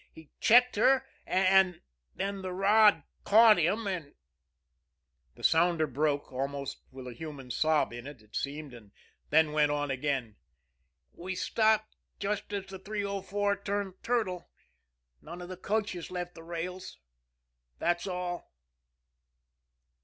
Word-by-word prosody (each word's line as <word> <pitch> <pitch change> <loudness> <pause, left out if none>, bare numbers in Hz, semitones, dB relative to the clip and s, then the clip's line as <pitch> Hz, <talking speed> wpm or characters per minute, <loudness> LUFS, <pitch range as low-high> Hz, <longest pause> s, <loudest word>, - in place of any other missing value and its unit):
He 160 -2 -15
checked 245 0 +5
her, 265 +4 +4 0.2
and 190 -1 +4 0.4
then 195 0 -3
the 185 -1 -4
rod 200 -2 +5 0.2
caught 220 -1 +7
him, 195 +7 +1
and 180 -7 -4 0.6
" 65 0 -48
The - - -15
sounder 165 0 +3
broke, 145 +1 -1
almost 140 +1 -4
with 130 -1 -10
a 125 - -7
human 135 -1 -8
sob 155 -2 +2
in 120 +2 -8
it, 145 -3 -10
it 105 - -16
seemed, 145 -1 -4
and 105 -4 -14 0.4
then 155 0 +4
went 150 -1 +3
on 145 -1 -1
again: 130 -5 -2 0.8
"We 185 +2 -6
stopped 215 +3 +1 0.2
just 205 +1 -3
as 200 -1 -3
the 190 -1 -9
304 200 0 -2
turned 200 -1 -3
turtle. 215 -7 -1 0.7
None 170 +3 -9
of 175 0 -8
the 185 - -5
coaches 200 -2 -2
left 180 -1 -5
the 165 - -12
rails. 170 - -6 0.8
That's 175 - 0
all." 180 -1 -4
175 Hz, 135 wpm, -30 LUFS, 145-200 Hz, 0.8 s, caught